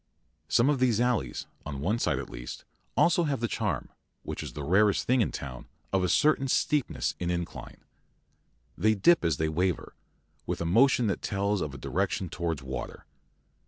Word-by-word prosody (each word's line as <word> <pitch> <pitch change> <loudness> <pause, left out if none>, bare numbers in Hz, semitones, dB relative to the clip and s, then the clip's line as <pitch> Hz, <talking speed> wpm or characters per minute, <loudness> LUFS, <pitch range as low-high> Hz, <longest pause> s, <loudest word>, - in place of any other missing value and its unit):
Some 120 +2 +3
of 145 -2 +2
these 120 -4 +3
alleys, 120 - 0 0.2
on 70 -1 -5
one 105 +11 0
side - - +1
at - - -4
least, - - -8
have - - -29 0.3
also 175 0 +4
the 135 -6 0
charm, - - -2 0.3
which - - -5
is - - -7
the 75 - -5
rarest 100 +6 +3
thing 125 0 +3
in 110 - +1
town, 65 -3 -7 0.3
of 95 -1 +2
a 90 - +1
certain 150 - +3
steepness 145 +1 +1
in 85 - -2
incline. 85 -1 -5 0.9
They 110 +4 +3
dip 170 - +4
as 80 -5 +1
they 80 - 0
waver, 90 +3 -1 0.5
with - - -2
a 85 - -2
motion 120 +7 +4
that 100 - -1
tells 100 0 0
of 70 -2 -4
a - - -6
direction 95 -1 -1
towards 80 -4 -3
water. 65 -1 -6
95 Hz, 180 wpm, -28 LUFS, 80-125 Hz, 0.9 s, also